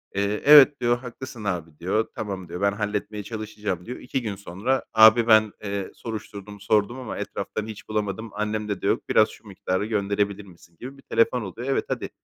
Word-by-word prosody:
Eee, 100 +1 0
"evet" 145 -1 +8
diyor, 120 0 +2
"haklısın 125 -1 -9
abi" 85 -6 -4
diyor. 100 +6 0
"Tamam" 95 -4 -5
diyor, 90 - -6
"ben 100 0 +3
halletmeye 105 0 -3
çalışacağım" 105 -5 -5
diyor. 125 - -6
2 130 +1 -3
gün 105 -4 -4
sonra 100 +7 -2
abi 110 +1 +7
"ben, 110 -1 +5
eee, 100 -2 -4
soruşturdum, 105 -2 -8
sordum 105 +4 +1
ama 125 - -6
etraftan 110 0 -4
hiç 110 0 -10
bulamadım. 110 +1 -2
Annemde 105 -1 -3
de - - -1
yok. - - 0
Biraz 110 0 +5
şu 110 - -15
miktarı 95 0 -2
gönderebilir 100 -1 -1
misin" 85 -2 -18
gibi 135 +3 -8
bir - - -16
telefon 125 -1 +1
oluyor. 115 +5 -6
Evet, 135 - +1
hadi - - -3
105 Hz, 185 wpm, -24 LUFS, 100-115 Hz, -, evet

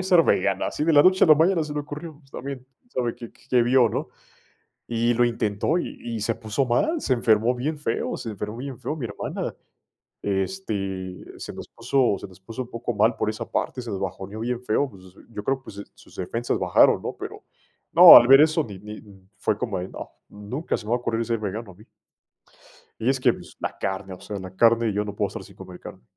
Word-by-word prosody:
hacer 180 -3 +4
vegana". 95 0 +1
Así - - -3
de 160 +1 +3
la 145 0 +7
noche 185 0 +5
a - - +6
la 155 - +8
mañana, 165 +1 +3
se 150 - -5
le 150 - -3
ocurrió, 150 +1 -8
pues 135 -3 -26
también 135 -1 -7 0.2
sabe 120 - -2
qué 115 - -10
qué - - -25
qué 125 -2 +4
vio, 125 0 +4
¿no? - - -3 0.8
Y 120 +1 +1
lo 120 +1 +3
intentó 115 +5 0
y 175 - -3
y 115 -2 -4
se 115 +2 0
puso 110 +4 -1
mal, 220 - +1
se 130 - 0
enfermó 115 0 +3
bien 145 +5 -3
feo, 115 -6 -2
se 115 - -6
enfermó 105 +1 -6
bien 130 -1 -6
feo 155 - -4
mi 140 - -5
hermana, 105 -3 -4 0.7
este, 95 - -3
se - - -7
nos - - -9
puso 125 -7 +1
se - - -8
nos 95 0 -18
puso 115 +6 -6
un 120 - -15
poco 115 +1 -4
mal 110 +3 +3
por - - -1
esa 110 - -5
parte, 125 - -2
se 120 - -8
nos 100 -2 -4
bajoneó 95 +3 -5
bien 120 +1 -2
feo, 135 +6 +1
pues, 95 -6 -15 0.3
yo 105 -3 -7
creo, 135 0 -1
pues, 100 - -11
su 100 - -6
sus - - -18
defensas 115 +6 -2
bajaron, - - +4
¿no? - - -5
Pero, - - -8 0.5
no, - - +12
al 120 - +6
ver 135 +2 +9
eso 155 +1 +3
ni 100 -3 -9
ni 105 +2 -9 0.4
Fue 105 - 0
como 110 -3 -3
de 90 - -5
no, - - -9 0.2
nunca 105 +10 -4
se 105 - -10
me - - -7
va 120 - +3
ocurrir 115 -1 -1
ser 115 0 0
vegano 105 0 -5
a - - -17
mí. 105 +4 -18 1.2
Y 115 - 0
es 135 0 +2
que 130 - +4 0.3
la - - -4
carne, 95 0 -3
o 90 - -14
sea, 105 - -6
la 95 0 -9
carne. 115 +1 +4
Yo 105 +1 -1
no 105 -1 -6
puedo 100 -1 0
estar - - -8
sin - - -16
comer - - -11
carne. - - -11
115 Hz, 230 wpm, -24 LUFS, 105-135 Hz, 1.2 s, no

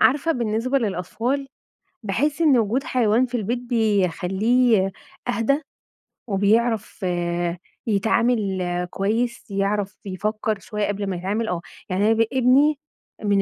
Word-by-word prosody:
عارفة 295 +4 +4
بالنسبة 240 +2 0
للأطفال، 230 +7 -2 0.5
باحس 270 - 0
إن 285 -6 +5
وجود 230 +5 +1
حيوان 240 0 +2
في 250 0 -3
البيت 235 +2 -1
بيخلّيه 215 -1 +2 0.4
أهدى، 245 +5 +1 0.7
وبيعرف 215 +1 +1 0.8
يتعامِل 220 -1 +1 0.3
كويس، 230 +4 -2
يعرف 200 0 -1
يفكر 215 +2 -2
شوية 210 +1 -3
قبل 205 0 -2
ما 190 - -2
يتعامِل، 200 +6 -2
آه، 180 -4 -2 0.3
يعني 190 +2 +1
أنا 225 - +5
ب 225 0 +3
ابني 265 +4 +4 0.4
من 200 -1 +3
220 Hz, 115 wpm, -23 LUFS, 200-245 Hz, 0.8 s, إن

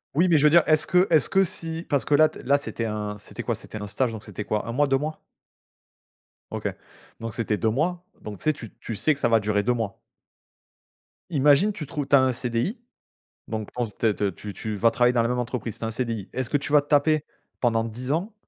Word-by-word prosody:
Oui, 170 +5 +4
mais 165 - +5
je 145 - +2
veux - - +8
dire 170 +2 +6
est-ce 155 0 +3
que 180 0 +4
est-ce 155 -4 +4
que 195 0 +4
si 165 -2 -4
parce 140 -3 +1
que 145 - +3
là 155 +1 +6
t - - -11
là 140 +2 +4
c'était 130 -5 -4
un 105 -1 -3
c'était - - -8
quoi? - - -1
C'était 110 - -9
un 105 - -5
stage? 115 +4 0
Donc, 110 -2 -8
c'était 105 - -7
quoi 105 +1 -2
1 - - -2
mois, 145 +5 +2
2 135 0 +3
mois? 155 +3 -4 1.3
OK. - - -3 0.5
Donc, 115 -1 -5
c'était 110 -2 -1
2 110 - +1
mois. 170 +9 -1 0.2
Donc, 105 -1 -7
tu - - -14
sais, 155 0 +3
tu 115 -7 -10
tu 115 - -5
sais 155 +9 +3
que 140 - -9
ça - - +2
va 115 -1 +5
durer 105 -1 0
2 125 +4 +2
mois. 115 -4 -3 1.3
Imagine, 150 +6 +4
tu 160 - -6
trouves 145 -1 -4
tu - - +5
as 135 - +7
un 130 0 +3
CDI 125 - -2 0.7
donc 110 -2 -4
ton 125 - -2
s 105 -3 -8
t 110 0 +1
te 100 - 0
tu 100 +3 -7
tu 110 +2 -5
vas 115 +3 +4
travailler 120 +2 +3
dans 120 - +3
la 115 - 0
même 125 +1 -1
entreprise, 120 -2 -3
c'est - - -5
un 115 - -1
CDI. 115 -4 -3
Est-ce 130 -1 -2
que 145 - +2
tu 140 - -6
vas 150 -1 +6
te 145 - -22
taper 150 +1 +3 0.4
pendant 115 -2 +2
10 125 +4 -4
ans, 185 +8 -2
125 Hz, 255 wpm, -25 LUFS, 110-150 Hz, 1.3 s, veux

